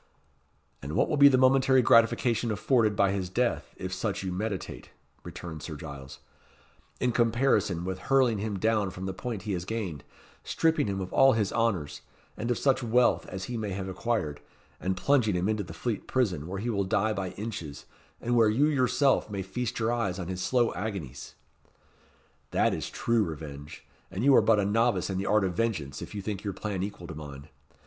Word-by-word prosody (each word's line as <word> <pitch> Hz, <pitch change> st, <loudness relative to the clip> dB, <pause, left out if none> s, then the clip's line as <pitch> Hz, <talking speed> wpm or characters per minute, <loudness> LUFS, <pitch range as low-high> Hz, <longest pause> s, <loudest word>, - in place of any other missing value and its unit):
"And 70 Hz, +3 st, -6 dB
what -, -, +2 dB
will 150 Hz, -, 0 dB
be 140 Hz, 0 st, +9 dB
the 135 Hz, -2 st, +5 dB
momentary 130 Hz, 0 st, +4 dB
gratification 115 Hz, 0 st, +3 dB
afforded 110 Hz, 0 st, +2 dB
by 100 Hz, -1 st, +3 dB
his 95 Hz, -2 st, -2 dB
death 120 Hz, +5 st, -1 dB
if 95 Hz, 0 st, -5 dB
such 100 Hz, +1 st, -2 dB
you 95 Hz, -, -3 dB
meditate," 100 Hz, +1 st, -4 dB, 0.3 s
returned 80 Hz, -3 st, -8 dB
Sir 80 Hz, -, -6 dB
Giles, 70 Hz, -3 st, -9 dB, 0.8 s
"in 125 Hz, -, +1 dB
comparison 115 Hz, -7 st, +1 dB
with 95 Hz, 0 st, -3 dB
hurling 130 Hz, -6 st, +3 dB
him 105 Hz, -1 st, -3 dB
down 110 Hz, 0 st, +1 dB
from 90 Hz, +1 st, -7 dB
the 95 Hz, -, -3 dB
point 110 Hz, -1 st, -5 dB
he 105 Hz, -, -3 dB
has 90 Hz, -3 st, -2 dB
gained, 95 Hz, -, -4 dB, 0.4 s
stripping 160 Hz, -5 st, +1 dB
him 95 Hz, -1 st, -2 dB
of 95 Hz, -, -6 dB
all 135 Hz, 0 st, +6 dB
his 105 Hz, -3 st, 0 dB
honours, 100 Hz, -11 st, -1 dB, 0.3 s
and 115 Hz, -, -4 dB
of 120 Hz, -, +1 dB
such 135 Hz, -2 st, +2 dB
wealth 120 Hz, +1 st, +2 dB
as 95 Hz, 0 st, -6 dB
he 120 Hz, +4 st, -4 dB
may 105 Hz, -3 st, -3 dB
have 95 Hz, 0 st, -4 dB
acquired, 95 Hz, -6 st, -2 dB, 0.4 s
and 95 Hz, 0 st, -2 dB
plunging 125 Hz, -9 st, +2 dB
him 90 Hz, +2 st, 0 dB
into 110 Hz, -1 st, 0 dB
the 90 Hz, -, -8 dB
Fleet 105 Hz, +6 st, -4 dB
Prison, 95 Hz, -, 0 dB
where 95 Hz, +2 st, -4 dB
he 120 Hz, +4 st, -2 dB
will 100 Hz, -2 st, 0 dB
die 105 Hz, +3 st, +1 dB
by 95 Hz, -3 st, -3 dB
inches, 100 Hz, -10 st, -6 dB, 0.3 s
and 120 Hz, +1 st, -1 dB
where 115 Hz, -2 st, +5 dB
you 125 Hz, +7 st, +3 dB
yourself 140 Hz, -3 st, +2 dB
may 100 Hz, -2 st, -3 dB
feast 115 Hz, +6 st, -4 dB
your 115 Hz, +1 st, +1 dB
eyes 100 Hz, -6 st, -1 dB
on 90 Hz, -2 st, -5 dB
his 90 Hz, 0 st, -4 dB
slow 120 Hz, +4 st, +2 dB
agonies? 90 Hz, -, -6 dB, 1.1 s
That -, -, +2 dB
is -, -, -4 dB
true 115 Hz, -2 st, +1 dB
revenge; 75 Hz, -3 st, -8 dB, 0.2 s
and 95 Hz, +4 st, -4 dB
you 140 Hz, +1 st, +6 dB
are -, -, +7 dB
but 110 Hz, -2 st, +4 dB
a 100 Hz, -, +1 dB
novice 105 Hz, -2 st, +1 dB
in 95 Hz, -, -2 dB
the 100 Hz, -, -3 dB
art 105 Hz, -1 st, +3 dB
of 95 Hz, -2 st, -1 dB
vengeance 90 Hz, -10 st, -2 dB
if -, -, -8 dB
you 100 Hz, -, -4 dB
think 100 Hz, -1 st, -4 dB
your 100 Hz, -2 st, -3 dB
plan 100 Hz, -1 st, -4 dB
equal 100 Hz, -2 st, -5 dB
to 80 Hz, -, -7 dB
mine. 70 Hz, -1 st, -9 dB
105 Hz, 200 wpm, -28 LUFS, 90-115 Hz, 1.1 s, be